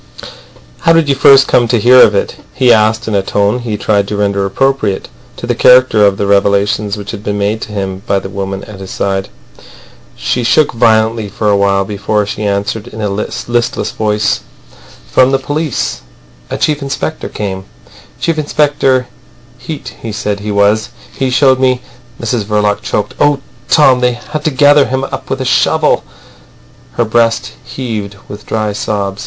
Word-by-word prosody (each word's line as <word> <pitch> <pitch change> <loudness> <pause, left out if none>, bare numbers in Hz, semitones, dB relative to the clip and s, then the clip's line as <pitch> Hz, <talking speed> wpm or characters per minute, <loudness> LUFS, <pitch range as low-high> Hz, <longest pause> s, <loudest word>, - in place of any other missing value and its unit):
"How 165 - +3
did 165 -2 +3
you - - +4
first 135 0 +6
come 120 -1 +3
to 120 0 +1
hear 125 +4 +6
of 105 - +5
it?" 100 - -1 0.2
he 125 -2 +4
asked 110 +1 +1
in 110 - -2
a 100 - +2
tone 100 +4 0
he 115 -4 -4
tried 100 -1 0
to 105 - -3
render 100 -1 0
appropriate 110 -2 -1 0.3
to - - -6
the - - 0
character 125 -4 +5
of 100 -1 0
the 100 - -1
revelations 100 +1 +1
which 100 -1 -7
had 105 -2 -8
been 105 -1 -2
made 105 +2 -1
to - - -7
him 95 -2 -4
by 100 - +2
the 95 - -4
woman 95 0 -5
at 105 -2 -11
his 95 -1 -8
side. 95 -1 -2 0.9
She 60 - -2
shook 150 +5 +3
violently 110 -2 +2
for 105 +2 -1
a - - +3
while 100 -1 +1
before 105 +1 -1
she 105 - -5
answered 100 +3 -2
in 110 - -10
a 105 -1 -1
listless 120 +3 -2
voice. 105 -1 0 0.7
"From 130 0 +4
the 135 - +2
police. 145 0 -3 0.5
A - - -3
chief 150 -1 0
inspector 140 +3 -4
came, 95 -2 -5 0.5
Chief 165 -2 -1
Inspector 145 -4 +1 0.5
Heat 155 -3 -7
he 115 - -5
said 105 -1 -3
he 105 +1 -6
was. 100 +2 +2 0.3
He 135 -1 -1
showed 130 0 +3
me—" 130 -1 +2 0.4
Mrs 115 0 -1
Verloc 105 -1 0
choked. 105 -1 -2
"Oh, 145 -1 +3 0.3
Tom, 135 -5 +5
they 125 0 +2
had 150 +6 -6
to - - +3
gather 145 0 +4
him 130 +1 -2
up - - -6
with - - -2
a - - -2
shovel." - - +2 0.9
Her 120 - 0
breast 115 +1 +1
heaved 110 -6 -5
with 105 +1 -10
dry 110 -1 -1
sobs. 100 -1 -3
110 Hz, 180 wpm, -13 LUFS, 100-130 Hz, 0.9 s, first